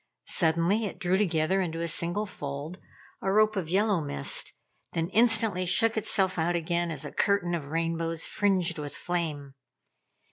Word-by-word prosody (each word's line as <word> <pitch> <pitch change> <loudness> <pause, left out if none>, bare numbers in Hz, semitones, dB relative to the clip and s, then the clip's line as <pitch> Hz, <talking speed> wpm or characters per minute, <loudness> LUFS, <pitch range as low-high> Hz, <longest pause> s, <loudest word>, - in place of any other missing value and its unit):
Suddenly 170 +6 +2
it 200 - -5
drew 180 0 +1
together 185 -1 +1
in 165 -3 -3
a 170 0 -2
single 175 +5 +1
fold, 145 0 -6 0.4
a 195 - 0
rope 215 +1 +4
of 180 -5 -3
yellow 200 0 +2
mist, 70 - -2 0.4
then 165 0 -1
instantly 220 -4 +3
shook 225 +5 +3
itself 190 -4 +1
out 170 +2 +1
again 170 +1 -1
as 150 -3 -5
a - - -6
curtain 200 -4 +1
of 155 -5 -3
rainbows 165 +1 -1
fringed 185 -5 0
with 145 -2 -4
flame. 155 -6 -3
175 Hz, 155 wpm, -28 LUFS, 165-195 Hz, 0.4 s, rope